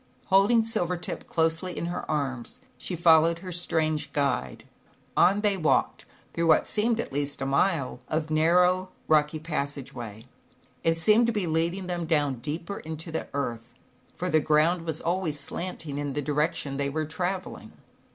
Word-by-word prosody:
Holding 205 Hz, +4 st, +5 dB
Silvertip 180 Hz, -6 st, -2 dB
closely 165 Hz, +2 st, 0 dB
in -, -, -2 dB
her 175 Hz, +1 st, -4 dB
arms, 140 Hz, -, -3 dB, 0.2 s
she 180 Hz, -, -5 dB
followed 165 Hz, 0 st, +5 dB
her 185 Hz, -, -5 dB
strange 160 Hz, -3 st, 0 dB
guide. 140 Hz, -, -1 dB, 0.5 s
On 200 Hz, +2 st, +4 dB
they 205 Hz, -2 st, +2 dB
walked 155 Hz, -4 st, +1 dB, 0.3 s
through 170 Hz, 0 st, 0 dB
what 160 Hz, -, +5 dB
seemed, 225 Hz, +2 st, +1 dB
at 230 Hz, -, -4 dB
least, 145 Hz, 0 st, -2 dB
a 135 Hz, -, -2 dB
mile 140 Hz, -1 st, +1 dB
of 155 Hz, 0 st, -2 dB
narrow, 180 Hz, +4 st, +3 dB, 0.2 s
rocky 155 Hz, 0 st, +3 dB
passage 145 Hz, -4 st, -3 dB
way. 110 Hz, -1 st, -8 dB, 0.6 s
It 165 Hz, 0 st, +2 dB
seemed 215 Hz, +8 st, +4 dB
to -, -, +2 dB
be 210 Hz, -4 st, -1 dB
leading 170 Hz, +4 st, 0 dB
them 175 Hz, -2 st, -3 dB
down 145 Hz, -6 st, +1 dB
deeper 160 Hz, +9 st, -5 dB
into 160 Hz, +1 st, -7 dB
the 160 Hz, -, -3 dB
earth, 120 Hz, -4 st, -4 dB, 0.4 s
for 180 Hz, -, -3 dB
the 155 Hz, -, +5 dB
ground 160 Hz, +3 st, +2 dB
was 160 Hz, -1 st, -3 dB
always 170 Hz, -4 st, -1 dB
slanting 150 Hz, -1 st, -5 dB
in 145 Hz, -1 st, -3 dB
the 145 Hz, +1 st, -2 dB
direc 150 Hz, +2 st, +1 dB
tion 140 Hz, -1 st, -4 dB
they 140 Hz, 0 st, 0 dB
were 155 Hz, +2 st, -2 dB
traveling. 180 Hz, +4 st, -4 dB
160 Hz, 165 wpm, -27 LUFS, 145-180 Hz, 0.6 s, Holding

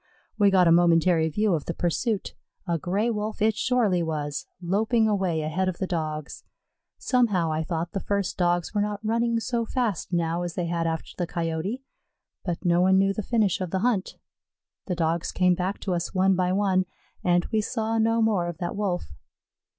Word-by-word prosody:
We 205 Hz, -1 st, +6 dB
got 185 Hz, -2 st, +4 dB
a -, -, +5 dB
momentary 165 Hz, -1 st, +4 dB
view 210 Hz, +5 st, +1 dB
of 155 Hz, -4 st, -1 dB
the 170 Hz, -, -4 dB
pursuit; 195 Hz, +5 st, -1 dB, 0.3 s
a 170 Hz, -1 st, 0 dB
Gray 200 Hz, +8 st, 0 dB
wolf 215 Hz, 0 st, -3 dB
it 220 Hz, 0 st, +2 dB
surely 220 Hz, -6 st, +2 dB
was, 150 Hz, -3 st, -3 dB
loping 220 Hz, +5 st, +1 dB
away 190 Hz, -6 st, 0 dB
ahead 180 Hz, +5 st, 0 dB
of 175 Hz, -, -5 dB
the 190 Hz, -, -1 dB
Dogs. 155 Hz, -4 st, -4 dB, 0.5 s
Somehow 205 Hz, -10 st, +1 dB
I 155 Hz, +1 st, -1 dB
thought 165 Hz, +1 st, -3 dB
the 195 Hz, -, -2 dB
first 200 Hz, -1 st, -1 dB
Dogs 175 Hz, 0 st, 0 dB
were 205 Hz, -, +1 dB
not 210 Hz, +1 st, -3 dB
running 230 Hz, +1 st, +1 dB
so 235 Hz, 0 st, -1 dB
fast 230 Hz, -6 st, -2 dB
now 170 Hz, 0 st, 0 dB
as 175 Hz, -1 st, -4 dB
they 175 Hz, -, -1 dB
had 170 Hz, 0 st, -1 dB
after 160 Hz, -1 st, -3 dB
the 175 Hz, -, 0 dB
Coyote. 170 Hz, +10 st, -3 dB, 0.6 s
But 175 Hz, 0 st, -4 dB
no 175 Hz, 0 st, +4 dB
one 190 Hz, +1 st, +4 dB
knew 195 Hz, 0 st, +3 dB
the 215 Hz, -, -3 dB
finish 210 Hz, -4 st, +1 dB
of 185 Hz, -, -2 dB
the 190 Hz, +2 st, -1 dB
hunt. 215 Hz, -6 st, 0 dB, 0.7 s
The 180 Hz, -, -1 dB
Dogs 165 Hz, 0 st, 0 dB
came 180 Hz, -1 st, +3 dB
back 185 Hz, +3 st, -2 dB
to 190 Hz, -, -1 dB
us 175 Hz, +2 st, -3 dB
one 190 Hz, +1 st, +4 dB
by 180 Hz, 0 st, +1 dB
one, 190 Hz, -1 st, +2 dB, 0.4 s
and 175 Hz, -1 st, +2 dB
we 220 Hz, -1 st, +2 dB
saw 225 Hz, 0 st, -1 dB
no 225 Hz, +1 st, +3 dB
more 200 Hz, -6 st, +1 dB
of 175 Hz, -2 st, -5 dB
that 175 Hz, +2 st, -4 dB
Wolf. 185 Hz, -, -2 dB
185 Hz, 195 wpm, -26 LUFS, 170-210 Hz, 0.7 s, We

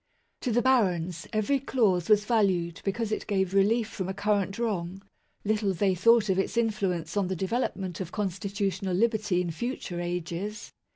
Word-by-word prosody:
To 250 Hz, -, -2 dB
the 240 Hz, +1 st, +2 dB
barons, 180 Hz, -10 st, +1 dB
every 220 Hz, +6 st, +1 dB
clause 215 Hz, -10 st, +1 dB
was 210 Hz, -1 st, +5 dB
valued 190 Hz, -7 st, +1 dB
because 215 Hz, +2 st, -2 dB
it -, -, -2 dB
gave 190 Hz, -2 st, 0 dB
relief 210 Hz, +3 st, +3 dB
from 190 Hz, -4 st, -5 dB
a 190 Hz, -, -3 dB
current 200 Hz, -1 st, 0 dB
wrong; 195 Hz, -5 st, -2 dB, 0.4 s
little 205 Hz, -2 st, +1 dB
they 195 Hz, +1 st, +2 dB
thought 220 Hz, +4 st, +4 dB
of 190 Hz, -1 st, +1 dB
its 195 Hz, -, -1 dB
influence 195 Hz, -7 st, 0 dB
on 200 Hz, -2 st, +1 dB
the 190 Hz, -, -2 dB
development 190 Hz, -2 st, -2 dB
of 180 Hz, -1 st, -5 dB
constitutional 195 Hz, -1 st, -2 dB
liberty 215 Hz, -3 st, +1 dB
in 175 Hz, -2 st, -2 dB
future 185 Hz, -3 st, -4 dB
ages. 175 Hz, +4 st, -4 dB
195 Hz, 165 wpm, -28 LUFS, 180-220 Hz, 0.4 s, was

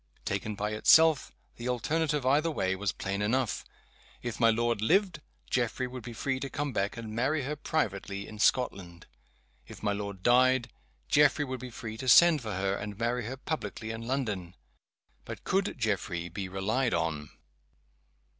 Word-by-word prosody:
Taken 100 Hz, +2 st, -2 dB
by 105 Hz, +1 st, -2 dB
itself, 160 Hz, +7 st, +5 dB, 0.3 s
the 120 Hz, +1 st, -4 dB
alternative, 150 Hz, +3 st, 0 dB
either 145 Hz, +5 st, +3 dB
way, 95 Hz, -11 st, 0 dB
was 100 Hz, 0 st, -1 dB
plain 100 Hz, +1 st, -3 dB
enough. 120 Hz, +3 st, 0 dB, 0.6 s
If 120 Hz, -2 st, -4 dB
my 115 Hz, -1 st, +5 dB
lord 115 Hz, -1 st, +1 dB
lived 185 Hz, -, +2 dB, 0.3 s
Geoffrey 125 Hz, +1 st, 0 dB
would 125 Hz, 0 st, -7 dB
be 120 Hz, -, -8 dB
free 130 Hz, +4 st, -2 dB
to 140 Hz, -, -4 dB
come 145 Hz, 0 st, -3 dB
back, 100 Hz, +1 st, -1 dB
and 110 Hz, -2 st, -6 dB
marry 135 Hz, +6 st, 0 dB
her 145 Hz, +4 st, -3 dB
privately 100 Hz, -10 st, -2 dB
in 110 Hz, -, -10 dB
Scotland. 95 Hz, -8 st, 0 dB, 0.6 s
If -, -, -12 dB
my 105 Hz, -1 st, +1 dB
lord 100 Hz, -2 st, -5 dB
died 125 Hz, 0 st, +4 dB, 0.4 s
Geoffrey 150 Hz, 0 st, +4 dB
would 130 Hz, -1 st, -5 dB
be 130 Hz, +1 st, -7 dB
free 110 Hz, -2 st, -7 dB
to 130 Hz, +2 st, -2 dB
send 170 Hz, +1 st, +7 dB
for 110 Hz, -3 st, -4 dB
her, 95 Hz, +1 st, 0 dB
and 105 Hz, 0 st, -5 dB
marry 120 Hz, +1 st, -1 dB
her 130 Hz, +2 st, -5 dB
publicly 130 Hz, -6 st, -4 dB
in 115 Hz, 0 st, -6 dB
London. 105 Hz, -10 st, -2 dB, 0.7 s
But -, -, -8 dB
could 195 Hz, +1 st, 0 dB
Geoffrey 95 Hz, -7 st, -2 dB
be 95 Hz, +2 st, -5 dB
relied 110 Hz, +7 st, 0 dB
on? 75 Hz, -2 st, -2 dB
115 Hz, 165 wpm, -29 LUFS, 100-130 Hz, 0.7 s, send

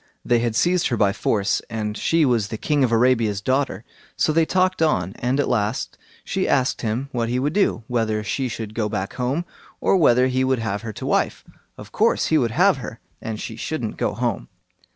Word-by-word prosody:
They 120 Hz, -1 st, +3 dB
had 115 Hz, -1 st, -1 dB
seized 175 Hz, +6 st, +2 dB
her 120 Hz, -, -1 dB
by 100 Hz, -2 st, +3 dB
force, 100 Hz, -1 st, 0 dB
and 105 Hz, -2 st, -3 dB
she 165 Hz, +7 st, +2 dB
was 120 Hz, -6 st, +1 dB
the 110 Hz, -, -5 dB
King 145 Hz, +4 st, +1 dB
of 125 Hz, -, +1 dB
Arabia's 115 Hz, -3 st, +2 dB
daughter. 130 Hz, -2 st, -1 dB, 0.3 s
So 155 Hz, -, +2 dB
they 165 Hz, 0 st, +3 dB
talked 185 Hz, -1 st, +1 dB
on, 95 Hz, -, +1 dB
and 125 Hz, +3 st, 0 dB
at 145 Hz, -, +1 dB
last 110 Hz, 0 st, -1 dB, 0.3 s
she -, -, -1 dB
asked 130 Hz, -1 st, +1 dB
him 120 Hz, +5 st, -2 dB
what 115 Hz, -3 st, -1 dB
he 125 Hz, -, 0 dB
would 145 Hz, +4 st, 0 dB
do; 195 Hz, -, +1 dB
whether 110 Hz, -3 st, 0 dB
she 130 Hz, +4 st, -2 dB
should 110 Hz, -2 st, -6 dB
go 110 Hz, -2 st, -1 dB
back 100 Hz, -2 st, -3 dB
home, 135 Hz, +7 st, -2 dB, 0.3 s
or -, -, +2 dB
whether 125 Hz, -7 st, +4 dB
he 130 Hz, 0 st, +1 dB
would 130 Hz, 0 st, +2 dB
have 105 Hz, -3 st, -3 dB
her 115 Hz, -1 st, -5 dB
to -, -, -7 dB
wife. -, -, 0 dB, 0.3 s
Of -, -, -11 dB
course -, -, +2 dB
he 160 Hz, -, +4 dB
would 120 Hz, -4 st, +1 dB
have 180 Hz, -, +3 dB
her, 115 Hz, -2 st, -8 dB, 0.2 s
and 110 Hz, -2 st, -5 dB
she 110 Hz, -, -6 dB
shouldn't 120 Hz, -4 st, -4 dB
go -, -, -1 dB
home. 115 Hz, -, -2 dB
120 Hz, 215 wpm, -22 LUFS, 110-140 Hz, 0.3 s, whether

